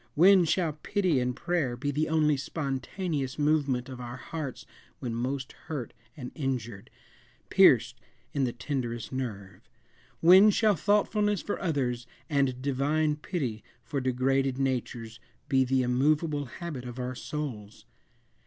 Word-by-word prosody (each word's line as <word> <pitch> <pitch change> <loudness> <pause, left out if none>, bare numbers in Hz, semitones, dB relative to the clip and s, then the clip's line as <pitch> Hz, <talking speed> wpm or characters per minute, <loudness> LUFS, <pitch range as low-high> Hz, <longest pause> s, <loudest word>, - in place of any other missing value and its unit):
When 185 +3 +7
shall 165 0 +1
pity 185 -9 +1
and 125 0 -1
prayer 170 -9 -1
be 145 +3 -2
the 155 +3 0
only 155 -2 +3
spontaneous 140 +1 -3
movement 145 -4 +1
of 130 -2 -8
our 120 0 -6
hearts 150 -2 -6 0.3
when 120 -3 -4
most 130 +3 -3 0.2
hurt 145 -8 -4 0.2
and 125 -3 -7
injured 120 -8 -4 0.6
pierced - - +5 0.3
in 140 - +1
the 125 - +1
tenderest 120 -4 -4
nerve? 100 -8 -5 0.6
When 185 +5 +8
shall 210 0 +3
thoughtfulness 205 +2 +1
for 205 - -3
others, 125 -8 -1 0.2
and 135 -3 +1
divine 150 +3 +1
pity 135 - -3 0.2
for 140 - -3
degraded 130 +1 +1
natures, 120 -4 -2 0.3
be 135 -1 +3
the 130 0 +1
immovable 145 +4 +1
habit 140 0 -6
of 125 0 -7
our 125 0 -3
souls? 115 -7 -6
135 Hz, 135 wpm, -28 LUFS, 125-155 Hz, 0.6 s, When